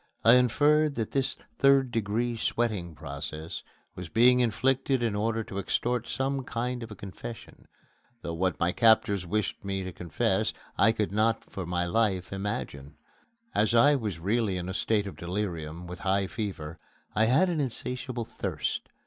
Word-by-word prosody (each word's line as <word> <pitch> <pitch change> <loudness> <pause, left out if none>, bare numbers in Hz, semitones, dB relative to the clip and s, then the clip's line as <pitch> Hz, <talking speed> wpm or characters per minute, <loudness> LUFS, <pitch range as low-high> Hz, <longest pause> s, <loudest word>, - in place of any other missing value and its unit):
I 115 - +9
inferred 145 +4 +4
that 110 -2 -2
this 135 -1 0 0.2
third 135 -2 +5
degree 115 +2 0
sweating 105 -8 -1
process 75 +3 -6 0.3
was 90 -2 -7
being 125 +2 +5
inflicted 130 +2 +1
in 115 -3 +1
order 110 +2 0
to 100 -2 -5
extort 120 +4 -1
some 135 0 -1
kind 125 0 -3
of 115 - -7
a 105 - -8
confession, 105 +5 -9 0.6
though 85 - -3
what 90 +2 0
my 85 - +2
captors 100 -4 +3
wished 105 +3 -1
me 95 -1 -2
to 95 - -5
confess 85 -3 0 0.2
I 110 +3 +5
could 105 -3 -1
not 110 +2 +1
for 95 -4 -5
my 90 0 0
life 95 -1 0
imagine. 75 -8 -4 0.6
As 110 +3 +2
I 145 +6 +7
was 110 - -2
really 100 +2 0
in 90 0 -4
a - - -3
state 105 +1 +1
of 100 - -7
delirium, 85 -3 -4
with 90 +1 -8
high 100 0 +1
fever, 90 -7 -5 0.3
I 110 - +3
had 135 +11 +4
an 165 -4 0
insatiable 125 -1 -3
thirst. - - -3
110 Hz, 165 wpm, -28 LUFS, 90-120 Hz, 0.6 s, I